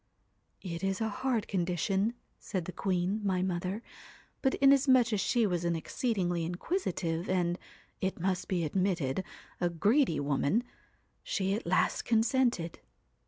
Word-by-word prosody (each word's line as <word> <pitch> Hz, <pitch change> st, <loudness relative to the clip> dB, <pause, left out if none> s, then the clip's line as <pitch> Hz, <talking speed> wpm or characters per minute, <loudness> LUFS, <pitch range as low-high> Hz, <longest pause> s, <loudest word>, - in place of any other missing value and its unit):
'"It 170 Hz, -2 st, -5 dB
is 195 Hz, 0 st, 0 dB
a 220 Hz, -1 st, 0 dB
hard 250 Hz, -1 st, -1 dB
condition," 190 Hz, +4 st, 0 dB, 0.2 s
said 185 Hz, -5 st, -3 dB
the 185 Hz, -, -5 dB
queen, 185 Hz, +3 st, -1 dB
my 185 Hz, -2 st, +1 dB
mother, 185 Hz, +4 st, -2 dB, 0.6 s
but 265 Hz, -, +2 dB
inasmuch 265 Hz, -4 st, +5 dB
as 205 Hz, -, +1 dB
she 235 Hz, +2 st, +2 dB
was 175 Hz, -4 st, 0 dB
an 170 Hz, -1 st, +1 dB
exceedingly 175 Hz, -1 st, -1 dB
inquisitive 175 Hz, -, -2 dB
and 175 Hz, -1 st, +1 dB, 0.4 s
it 190 Hz, -1 st, -2 dB
must 185 Hz, +1 st, -1 dB
be 180 Hz, -3 st, 0 dB
admitted 180 Hz, -2 st, 0 dB, 0.4 s
a 175 Hz, -, +1 dB
greedy 200 Hz, -, +2 dB
woman, 145 Hz, -, +1 dB, 0.6 s
she 195 Hz, -1 st, -1 dB
at 210 Hz, -3 st, -3 dB
last 185 Hz, -, +2 dB
consented. 235 Hz, -6 st, +1 dB
190 Hz, 135 wpm, -31 LUFS, 175-225 Hz, 0.6 s, inasmuch